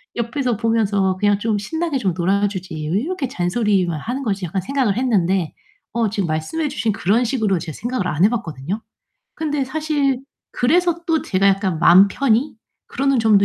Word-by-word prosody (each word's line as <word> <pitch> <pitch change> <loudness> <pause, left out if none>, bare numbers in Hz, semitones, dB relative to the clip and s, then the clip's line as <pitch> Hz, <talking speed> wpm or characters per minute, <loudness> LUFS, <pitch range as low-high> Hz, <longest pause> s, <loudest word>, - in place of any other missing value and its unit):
옆에서 240 0 -1
보면서 205 -4 +1
그냥 205 0 +3
좀 220 0 0
신나게 320 +7 -2
좀 190 -6 0
놀아 195 +3 +2
주지 185 -4 -6 0.2
왜 190 - +2
이렇게 320 -1 -3
잔소리만 185 -5 0
하는 250 - -4
거지?' 200 -5 -2
약간 185 +3 -2
생각을 245 -3 0
했는데 190 -9 +1 0.4
어 230 -1 +1
지금 200 -2 -1
말씀해 160 - -2
주신 225 -4 -1
그런 210 +4 +1
식으로 220 -7 0
제 160 0 -6
생각을 235 - -3
안 165 0 0
해 - - +5
봤거든요. 175 - -4 0.5
근데 295 -3 -1
사실 285 -2 0 0.3
그래서 340 +6 +1
또 320 -2 +1
제가 195 +1 +1
약간 190 -4 +1
'마음 175 +4 +7
편히 250 +4 +1 0.3
그러는 275 0 0
점도 215 -3 +4
215 Hz, 360 characters per minute, -20 LUFS, 190-265 Hz, 0.5 s, 마음